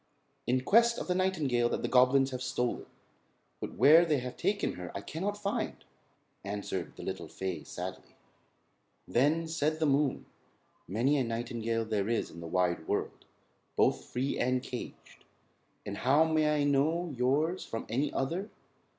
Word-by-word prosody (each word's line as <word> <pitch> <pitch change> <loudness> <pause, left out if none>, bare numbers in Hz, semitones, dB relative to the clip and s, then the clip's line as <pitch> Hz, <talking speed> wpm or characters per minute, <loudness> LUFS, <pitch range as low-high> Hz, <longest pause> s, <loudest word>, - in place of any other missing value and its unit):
"In 125 +1 +2
quest 235 - +5
of - - -4
the 180 - +2
nightingale 155 -11 +1
that - - -2
the - - +1
goblins 130 +2 +4
have 130 -1 -4
stolen; 125 -1 -2 0.7
but - - -6
where 160 +4 +7
they 155 -4 +2
have 125 -1 -5
taken 200 +3 0
her 90 -1 -7
I 100 - -3
cannot 195 - -3
find," 210 +3 -2 0.7
answered 100 -2 -4
the - - -9
little - - -4
fay 95 -5 -4
sadly. - - -7 0.9
Then 155 +6 +2
said 155 -1 0
the 160 - +2
moon: 140 -1 +1 0.6
"Many 120 - +2
a 135 - +2
nightingale 115 -1 -2
there 105 -1 -1
is 115 - -1
in 85 - -10
the 85 - -7
wide 85 -1 0
world, - - -2 0.5
both - - +2
free 130 +3 -2
and 125 +1 +1
caged, 125 -2 -8 0.6
and 100 0 -5
how 140 +5 +4
may 155 -1 +2
I - - +2
know 150 +4 +1
yours 145 +9 +1
from 115 - -5
any 135 +6 0
other? 170 +10 -2
135 Hz, 160 wpm, -31 LUFS, 115-160 Hz, 0.9 s, where